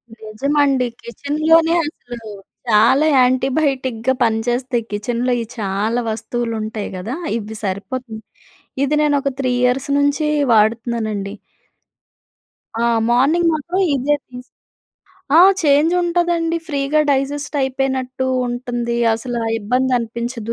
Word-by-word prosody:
నిజమండి. 260 +4 0 0.2
కిచెన్‌లోనే 315 +6 +2
అసలు 245 -6 -9 0.5
చాలా 235 +8 +4
యాంటిబయోటిక్‌గా 260 -1 +1
పనిచేస్తాయి. 240 +2 0
కిచెన్‌లో 240 +4 -1
ఈ - - -2
చాలా 210 +4 -1
వస్తువులు 230 +1 -3
ఉంటాయి 215 -1 -4
గదా, 220 +9 -5 0.2
ఇవి 220 0 -7
సరిపోతుంది. 220 +4 -4 0.6
ఇది 295 +2 0
నేను 295 -1 +2
ఒక 275 - 0
3 255 -2 0
ఇయర్స్ 255 +3 +1
నుంచి 285 +2 +1 0.3
వాడుతున్నానండి. 220 -2 0 1.5
ఆ! - - +2 0.2
మార్నింగ్ 300 +8 +3
మాత్రం 340 +5 -2
ఈజీగా 285 +2 +1
తీసుకొ 250 0 -12 0.8
ఆ! - - +9 0.2
చేంజ్ 295 +3 +4
ఉంటదండి. 340 -1 0
ఫ్రీగా 285 +1 +1
డైజెస్ట్ 285 +2 -2
అయిపోయినట్టు 260 -1 -2 0.2
ఉంటుంది. 240 -1 -3 0.2
అసలా 235 0 -4 0.2
ఇబ్బంది 255 +5 0
అనిపించదు. 235 0 -4
250 Hz, 105 wpm, -19 LUFS, 230-285 Hz, 1.5 s, ఆ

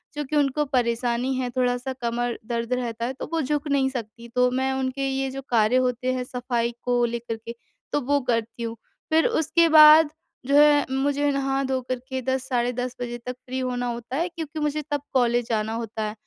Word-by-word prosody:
चूँकि 295 0 -3
उनको 290 +1 +2
परेशानी 240 +1 +1
है 255 -1 -2
थोड़ा 245 -1 +2 0.2
कमर 240 0 -1
दर्द 235 +1 -2
रहता 235 0 -2
तो 265 - -6
वो 325 - +1
झुक 295 +1 -1
नहीं 270 -1 +2
सकती 235 -2 -7
तो 250 0 +4
मैं 265 +1 0
उनके 265 +1 -2
ये 270 0 -1
जो 270 - -6
कार्य 225 0 +3
होते 250 +1 -1
हैं 255 -1 -2
सफाई 245 -2 -2
को 245 -1 +1
लेकर 235 -1 -3
के, 230 +1 -9 0.4
तो 290 - +1
वो 285 +2 +1
करती 235 0 -2
हूँ। 230 0 -4 0.4
फिर 320 +1 +4
उसके 330 +2 +2
बाद 310 0 +9 0.4
जो 280 +1 +2
है 295 -1 +6
मुझे 285 +2 +1
नहा 275 0 0
धो 265 -1 0
कर 255 - +1
के 260 0 -2
10:00 260 +1 0
साढ़े 245 -2 0
10 250 +1 -4
बजे 240 0 -4
तक 250 - -3
फ्री 260 +1 -4
होना 245 -1 -2
होता 240 +2 -5
है 345 +2 0
क्योंकि 320 -3 -6
मुझे 300 0 -1
तब 290 -1 0
कॉलेज 240 -2 +2
जाना 220 0 0
होता। 220 -2 -4
255 Hz, 200 wpm, -24 LUFS, 240-275 Hz, 0.4 s, बाद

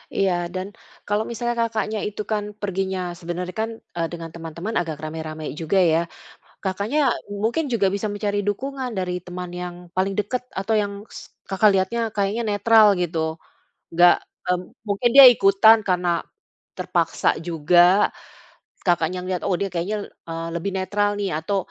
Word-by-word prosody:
Iya, 195 -1 +2 0.2
dan 185 +1 -3 0.4
kalau 205 +1 +1
misalnya 240 +1 -2
Kakaknya 220 -2 -1
itu 210 0 -5
kan 210 -1 0 0.2
perginya 190 -1 -2 0.2
sebenarnya 180 +1 -5
kan, 225 - -1 0.3
eee, 165 - 0
dengan 165 -1 -6
teman-teman 170 +6 -6
agak 165 -3 -3
rame-rame 155 0 -6 0.2
juga 165 +4 0
ya? 160 - +3 0.6
Kakaknya 200 +9 -1 0.4
mungkin 270 +8 +1
juga 200 -4 +3
bisa 200 +2 -3
mencari 205 0 -2
dukungan 260 +5 -2
dari 180 -1 -2
teman 180 0 -6
yang 180 -1 -5 0.2
paling 190 +1 +1
dekat 245 +5 -1 0.2
atau 210 +3 -1
yang 200 0 -3 0.2
s - - -9 0.3
Kakak 195 +2 +4
lihatnya 190 +5 0 0.2
kayaknya 205 +3 0
netral 220 +1 +5 0.2
gitu. 170 -1 -2 0.7
Enggak, 175 +1 +7 0.5
m - - -7 0.3
mungkin 205 +4 +1
dia 275 - +12
ikutan 210 +2 +6
karena 180 -1 +1 0.7
terpaksa - - 0 0.2
juga. 170 +1 +2 1.1
Kakaknya 175 0 +1
ngelihat, 185 -1 -2
"Oh 180 - +2
dia 200 - -1
kayaknya 175 +5 -2
le - - -9 0.2
eee, 165 0 -4
lebih 185 +4 -2
netral 205 +2 0
nih 200 -2 -1
atau 195 +6 -1
195 Hz, 150 wpm, -23 LUFS, 175-210 Hz, 1.1 s, dia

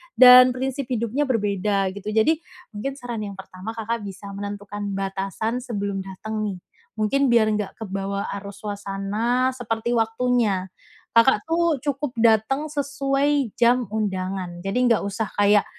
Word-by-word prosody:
dan 250 0 +9
prinsip 265 0 -3
hidupnya 245 +4 -1
berbeda, 200 -4 0
gitu. 200 +1 -10
Jadi 310 +9 +3 0.3
mungkin 255 +6 -4
saran 240 -5 -5
yang 200 - -7
pertama 195 +3 -8
Kakak 225 -1 -3
bisa 200 +1 -8
menentukan 205 0 -5
batasan 195 +4 -2
sebelum 205 -6 -3
dateng 215 +3 -4
nih, 195 -3 -4 0.4
mungkin 270 +6 +1
biar 230 -3 +4
enggak 210 -2 -2
kebawa 200 -1 -4
arus 200 +1 -11
suasana 210 +5 -1
seperti 235 -2 -3
waktunya, 225 -4 +1 0.4
Kakak 230 -2 +5
tuh 335 -1 +2
cukup 280 -2 -2
datang 230 +6 +3
sesuai 275 -2 0
jam 245 +1 +4
undangan, 185 -4 -3
jadi 195 +4 -2
nggak 230 -3 +3
usah 200 +2 -2
kayak 205 0 +4
220 Hz, 135 wpm, -23 LUFS, 200-250 Hz, 0.4 s, dan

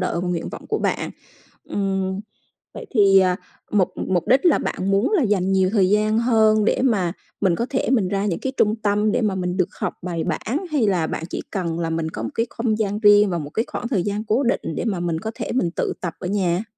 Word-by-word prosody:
đợi 180 -2 -1
và 180 - -2
nguyện 170 -2 -2
vọng - - -9
của - - 0
bạn. - - -1 0.6
Ừm, 195 -1 -1 0.6
vậy - - -8
thì, 200 -5 +5
à, 185 -1 +3 0.3
mục 200 -4 +3 0.2
mục 175 -3 0
đích 260 +5 +4
là 330 - +5
bạn 190 - -2
muốn 200 +4 +2
là 380 - +3
dành 195 -4 +1
nhiều 190 -1 +3
thời 195 -4 +3
gian 215 +1 +2
hơn 220 -3 +3
để - - +1
mà 195 -10 +1 0.3
mình 190 -4 +3
có 235 - -1
thể 265 - -1
mình 220 -8 +2
ra 200 +1 -1
những 180 -5 -1
cái 265 - -2
trung 215 +1 +2
tâm 210 0 +1
để - - +1
mà 210 -3 +1
mình 180 -1 -2
được 185 - +1
học - - -2
bài 170 -2 -3
bản, 225 - -2
hay 270 -7 +2
là 180 -5 +1
bạn 160 - -4
chỉ - - -4
cần 170 -5 -2
là 165 -1 -1
mình 160 0 -1
có 110 - -6
một 115 - -3
cái 230 - 0
không 230 -2 -1
gian 205 -1 -1
riêng 205 -1 +6
và 175 - -1
một 145 -2 -6
cái 225 - -1
khoảng 240 - -4
thời 215 -8 +1
gian 205 +3 -2
cố 225 +5 +1
định 245 -1 +1 0.2
để - - -2
mà 200 -7 -1
mình 170 -2 -1
có 220 - -4
thể - - -4
mình 205 -9 +1
tự - - -2
tập 170 -3 -4
ở 180 - -6
nhà? 185 -1 0
200 Hz, 255 wpm, -22 LUFS, 180-220 Hz, 0.6 s, riêng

